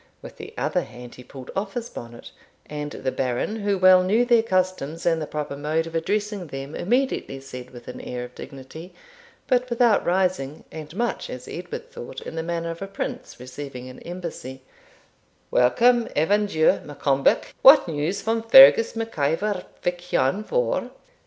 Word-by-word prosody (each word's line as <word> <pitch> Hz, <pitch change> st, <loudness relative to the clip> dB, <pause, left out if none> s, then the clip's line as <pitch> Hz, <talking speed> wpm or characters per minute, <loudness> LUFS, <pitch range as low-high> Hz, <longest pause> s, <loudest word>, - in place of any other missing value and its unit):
With -, -, -11 dB
the -, -, -9 dB
other -, -, 0 dB
hand 120 Hz, 0 st, -11 dB
he 125 Hz, -, -12 dB
pulled 130 Hz, +1 st, -11 dB
off 195 Hz, 0 st, -3 dB
his 240 Hz, -1 st, -3 dB
bonnet, 120 Hz, -, -10 dB, 0.3 s
and 150 Hz, 0 st, -5 dB
the 130 Hz, -, -3 dB
Baron, 130 Hz, -, -2 dB
who 205 Hz, -2 st, 0 dB
well 185 Hz, 0 st, +7 dB
knew 215 Hz, +7 st, +2 dB
their 240 Hz, -2 st, +5 dB
customs, 185 Hz, -6 st, -1 dB
and 165 Hz, -2 st, +2 dB
the 155 Hz, -, -4 dB
proper 150 Hz, -2 st, -4 dB
mode 155 Hz, +3 st, -1 dB
of 165 Hz, -, -9 dB
addressing 205 Hz, +2 st, -2 dB
them, 135 Hz, +1 st, -7 dB
immediately 245 Hz, -, -1 dB
said, 125 Hz, -2 st, -9 dB
with 120 Hz, -2 st, -13 dB
an 125 Hz, -, -7 dB
air 125 Hz, 0 st, -5 dB
of 125 Hz, 0 st, -10 dB
dignity, 140 Hz, +8 st, -10 dB, 0.5 s
but 250 Hz, -1 st, +1 dB
without 235 Hz, -2 st, +3 dB
rising, 180 Hz, -5 st, 0 dB
and 155 Hz, +1 st, -9 dB
much, 235 Hz, +3 st, -2 dB
as 125 Hz, 0 st, -8 dB
Edward 175 Hz, +1 st, -7 dB
thought, 125 Hz, +2 st, -8 dB
in -, -, -8 dB
the 165 Hz, -, -3 dB
manner 170 Hz, 0 st, -3 dB
of 165 Hz, -, -9 dB
a 195 Hz, -, -4 dB
prince 245 Hz, -, -6 dB
receiving 130 Hz, 0 st, -8 dB
an 130 Hz, -, -11 dB
embassy, 170 Hz, -7 st, -7 dB, 0.9 s
'Welcome, 235 Hz, -, +4 dB
Evan 205 Hz, +7 st, +2 dB
Dhu 160 Hz, -5 st, +3 dB
Maccombich; 140 Hz, -1 st, +1 dB
what 275 Hz, -3 st, +8 dB
news 165 Hz, +5 st, -2 dB
from 225 Hz, +1 st, 0 dB
Fergus 230 Hz, 0 st, +8 dB
Mac 225 Hz, -6 st, -5 dB
Ivor 180 Hz, +7 st, 0 dB, 0.2 s
Vich 175 Hz, 0 st, -3 dB
lan 135 Hz, +11 st, +2 dB
Vohr?' -, -, -1 dB
170 Hz, 170 wpm, -24 LUFS, 135-210 Hz, 0.9 s, what